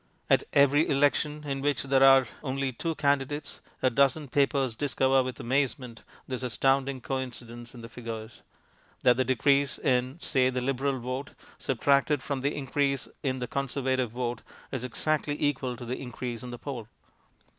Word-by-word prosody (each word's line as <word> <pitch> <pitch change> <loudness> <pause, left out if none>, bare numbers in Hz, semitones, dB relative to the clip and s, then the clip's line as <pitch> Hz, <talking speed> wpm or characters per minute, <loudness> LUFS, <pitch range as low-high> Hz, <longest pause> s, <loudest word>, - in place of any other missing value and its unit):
At - - +5
every 145 +2 +5
election 145 +1 +2
in 135 -2 -3
which 145 0 +1
there 135 -1 +2
are 135 -2 +7
only 135 -1 -2
two 165 +6 -3
candidates 145 0 -1 0.2
a 130 - +4
dozen 140 +3 +2
papers 135 -2 +2
discover 135 +2 +2
with 130 -1 -5
amazement 130 -2 -1 0.3
this 130 -1 -4
astounding 135 +1 +1
coincidence 120 -2 -5
in 120 - -9
the 115 - -8
figures: 115 -2 -8 0.6
that 125 -1 +6
the 130 - +2
decrease 140 +1 +2
in, 130 +2 0
say, 130 -6 +2
the 130 0 -1
Liberal 135 +1 0
vote 130 +3 -5 0.2
subtracted 140 +2 +2
from 140 -2 -2
the 140 +2 0
increase 140 0 0
in 130 -2 -1
the 125 -1 -4
Conservative 130 -2 -1
vote 120 0 -3 0.3
is 130 -3 -3
exactly 145 +3 -1
equal 130 -4 0
to 120 - -8
the 125 +2 -4
increase 125 -2 -5
in 125 - -7
the 120 - -6
poll. 120 -5 -6
130 Hz, 160 wpm, -28 LUFS, 125-140 Hz, 0.6 s, are